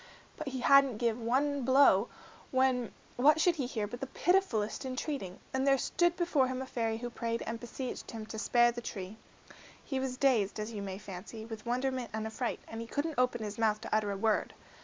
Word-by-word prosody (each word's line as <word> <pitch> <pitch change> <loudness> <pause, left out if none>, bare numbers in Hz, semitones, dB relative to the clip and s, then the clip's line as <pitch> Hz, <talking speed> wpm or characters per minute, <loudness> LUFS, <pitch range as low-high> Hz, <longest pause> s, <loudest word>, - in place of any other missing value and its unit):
But 310 - -6
he 260 -2 -3
hadn't 275 -3 +6
given 230 0 -1
one 280 +3 +1
blow, 260 -5 +5 0.4
when 260 -3 +2 0.3
what 295 +5 +5
should 345 +1 +3
he 265 -4 -1
hear 220 -4 -2
but 240 +4 -7
the 270 - -4
pitifullest 265 - +1
entreating, 260 - -4 0.2
and 265 +1 +1
there 275 0 +5
stood 345 +6 +1
before 335 -7 +2
him 255 0 -3
a 265 - -3
fairy 225 -3 -1
who 240 +1 -5
prayed 230 0 -2
and 230 0 -4
beseeched 245 +2 -6
him 225 -2 -6
to 220 0 -6
spare 240 +2 +4
the 240 0 -6
tree. 200 -2 -6 0.7
He 270 - -2
was 260 -1 -3
dazed, 235 -8 +2
as 215 +2 -3
you 210 -3 -5
may 190 -1 -5
fancy, 205 +3 -8
with 225 0 -8
wonderment 255 0 -1
and 220 0 -2
affright, 220 +2 -3
and 225 0 -6
he 230 - -6
couldn't 290 +2 -2
open 250 -2 +1
his 210 +1 -5
mouth 215 -2 +2
to 225 - -1
utter 215 -1 +1
a 200 - -3
word. 215 +1 +1
240 Hz, 210 wpm, -32 LUFS, 220-265 Hz, 0.7 s, hadn't